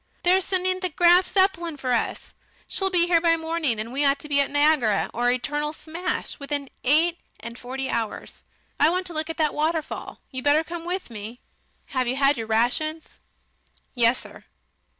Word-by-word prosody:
They're 370 +2 +4
sending 370 0 0
the 365 -1 -1
Graf 350 +2 +4
Zeppelin 345 -5 +1
for 255 -2 -1
us. 235 - -2 0.3
She'll 385 -1 0
be 355 -2 +3
here 345 -1 +3
by 335 -1 +4
the - - +1
morning, 320 -8 -1
and 225 +3 -5
we 280 +2 +1
ought 280 0 +3
to - - -9
be 285 -1 +2
at 280 - -1
Niagara 290 -8 +2
or 240 +1 +1
eternal 295 +5 -1
smash 330 +3 -4
within 280 -1 -4
eight 330 +6 +3 0.2
and 235 +1 -8
forty 265 +2 -4
hours.... 225 -4 -4 0.4
I 305 - +5
want 365 +2 -1
to 350 - -3
look 315 +1 -2
at 325 - -5
that 310 -3 +1
waterfall. 315 0 -2
You'd 260 -2 -5
better 295 +2 +4
come 335 0 -7
with 360 -6 -4
me. 220 +2 -8 0.5
Have 255 -2 -1
you 250 - 0
had 275 +1 +3
your 225 -2 -5
rations?" 250 +8 -1 0.7
"Yessir." 240 0 0
300 Hz, 185 wpm, -24 LUFS, 255-340 Hz, 0.7 s, I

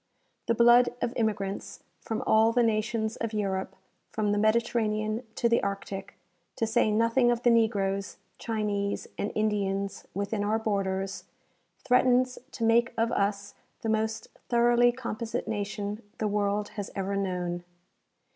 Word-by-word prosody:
The 230 - +2
blood 240 +1 +6
of 240 - -1
immi 220 -3 +1
grants 195 0 -6 0.2
from 225 -1 -4
all 220 +1 +5
the 240 +1 +3
nations 220 0 0
of 230 -1 -3
Europe, 195 -2 -2 0.3
from 210 -2 -1
the 205 - +1
Mediterranean 215 0 +1
to 235 - +2
the 235 0 +3
Arctic, 200 -1 -4 0.4
to 225 - 0
say 225 0 +2
nothing 230 +3 +3
of 240 0 0
the 240 - +5
negroes, 200 -4 +1 0.2
Chinese 205 -3 -2
and 205 - -1
Indians 200 -2 -1
within 200 +1 -1
our 215 +2 +1
borders, 195 -3 -2 0.6
threatens 250 0 +3
to 230 - -5
make 230 +2 +3
of 230 +1 +1
us 200 0 -1 0.3
the 225 - -1
most 220 0 -1 0.2
thoroughly 240 0 +4
composite 235 -2 -4
nation 205 0 -3 0.2
the 215 - 0
world 205 0 0
has 205 -3 -6
ever 195 0 -2
known. 180 -3 -2
215 Hz, 145 wpm, -28 LUFS, 200-230 Hz, 0.6 s, blood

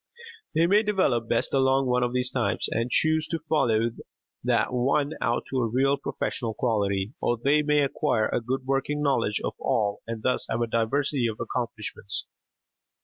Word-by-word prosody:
They 165 +2 +4
may 200 +4 +5
develop 185 - +1
best 115 - 0
along 135 0 +3
one 125 0 +2
of 120 0 +1
these 125 0 +1
types, 100 -8 0
and 115 +2 -1
choose 155 +4 +2
to 165 - -2
follow 120 -8 +1 0.5
that - - +1
one 140 +4 +1
out 120 +2 0
to 130 - 0
a 120 - +1
real 135 +5 +2
professional 115 -4 -3
quality, 100 -2 0
or 120 - +1
they 140 +6 +3
may 150 0 +2
acquire 115 -5 +1
a - - -1
good 130 +3 -3
working 135 +2 -1
knowledge 115 -7 +1
of - - -2
all 105 -2 0
and 115 -1 -5
thus 125 - 0
have 115 - -1
a - - +2
diversity 120 +3 0
of 110 -1 -4
accomplishments. 115 -4 -4
125 Hz, 175 wpm, -26 LUFS, 115-140 Hz, 0.5 s, may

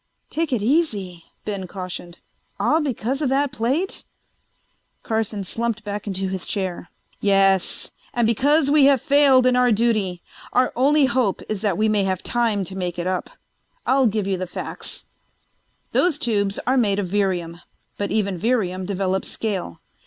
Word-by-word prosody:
"Take 325 -1 -1
it 235 -5 0
easy," 210 - 0 0.2
Ben 200 -3 -4
cautioned. 180 -2 -7 0.4
"All 315 +2 +3
because 270 -1 -2
of 285 - +1
that 275 +1 +1
plate?" 275 +9 -1 1.0
Carson 220 -2 -2
slumped 230 +3 -2
back 205 0 -5
into 195 -1 -2
his 190 -1 -4
chair. 185 -4 -3 0.3
"Yes. 195 -2 +2 0.2
And 240 -1 +1
because 280 +6 +3
we 295 -2 +6
have 275 -1 +5
failed 275 -2 +5
in 255 0 +4
our 250 -1 +4
duty. 210 -5 +1 0.3
Our 255 0 +2
only 285 +3 +4
hope 240 -6 0
is 215 -3 -3
that 200 -5 0
we 215 +1 +2
may 210 -2 +2
have 190 -1 -1
time 230 -4 0
to 190 +1 -6
make 180 -2 -3
it 175 - -3
up. 185 -1 -2 0.6
I'll 265 -1 +4
give 210 -2 -1
you 195 -1 0
the 185 - -3
facts: - - -5 0.9
"Those 350 -5 +2
tubes 205 -6 0
are 260 +2 +2
made 205 -5 +2
of 205 - 0
Virium, 175 -3 -1 0.4
but 200 - -1
even 200 -4 0
Virium 190 -5 0
develops 190 -1 -1
scale. 195 - -4
210 Hz, 160 wpm, -22 LUFS, 190-255 Hz, 1.0 s, we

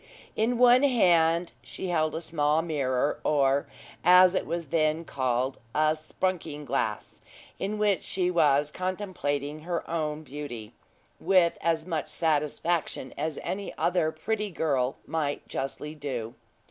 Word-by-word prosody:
In 230 +3 +1
one 245 +1 +6
hand 175 -10 +3
she 190 - -6
held 155 -3 +1
a 160 - -3
small 155 -1 +1
mirror, 140 -4 0
or, 140 -1 +2 0.4
as 180 0 +7
it - - -1
was 170 -3 -3
then 155 +1 +1
called, 130 -1 -1 0.2
a 155 0 +3
"sprunking 155 -2 -3
glass," 125 - -2 0.4
in 205 +2 -2
which 210 -2 +2
she 180 -1 0
was 145 -3 +3
contemplating 180 -6 -3
her 170 +2 -4
own 155 -2 -2
beauty, 135 -7 -7 0.5
with 180 -2 +3
as 165 -1 0
much 165 -4 -2
satisfaction 155 -2 0
as 155 0 -3
any 200 +1 -4
other 175 -3 +1
pretty 210 +6 -2
girl 140 -7 0
might 150 -3 -2
justly 145 +3 -4
do. 130 -7 -5
160 Hz, 135 wpm, -27 LUFS, 145-180 Hz, 0.5 s, as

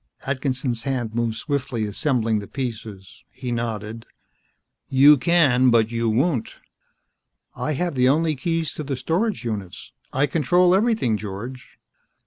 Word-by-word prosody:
Atkinson's 130 -3 -2
hands 120 -4 -3
moved 115 -1 -1
swiftly, 135 -4 -2
assembling 110 0 0
the 100 - -8
pieces. 110 -7 -7
He 125 -2 -6
nodded. 115 -1 -4 0.8
"You 140 +3 +7
can, 135 -4 +3
but 115 -2 +3
you 115 -1 0
won't." 130 +2 0 1.0
"I 155 - -2
have 175 +4 -1
the 125 -1 +3
only 155 +2 +2
keys 165 +3 -2
to 155 - -5
the 140 -1 -3
storage 180 - -1
units. 100 -6 -5 0.2
I 135 +2 +2
control 175 +5 +3
everything, 200 - +2
George." 110 +6 -8
130 Hz, 130 wpm, -23 LUFS, 115-150 Hz, 1.0 s, You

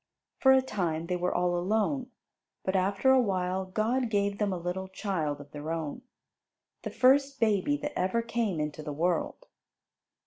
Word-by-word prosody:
For 265 - +6
a 265 0 +5
time 170 -9 -2
they 180 +1 -1
were 180 0 0
all 175 0 +1
alone, 220 +9 0 0.5
but 190 - -1
after 195 +7 +3
a 265 -1 +6
while 190 -3 -1
God 225 +6 0
gave 200 -1 0
them 205 -2 +1
a 185 - -2
little 180 +2 -4
child 185 -7 -2
of 145 0 -12
their 150 +1 -5
own, 160 -3 -4 0.8
the - - -4
first 275 +2 +3
baby 220 +5 +2
that 295 0 -5
ever 190 +6 0
came 230 -7 -1
into 150 0 -3
the 150 -1 -5
world. 170 +3 -1
190 Hz, 170 wpm, -29 LUFS, 175-230 Hz, 0.8 s, For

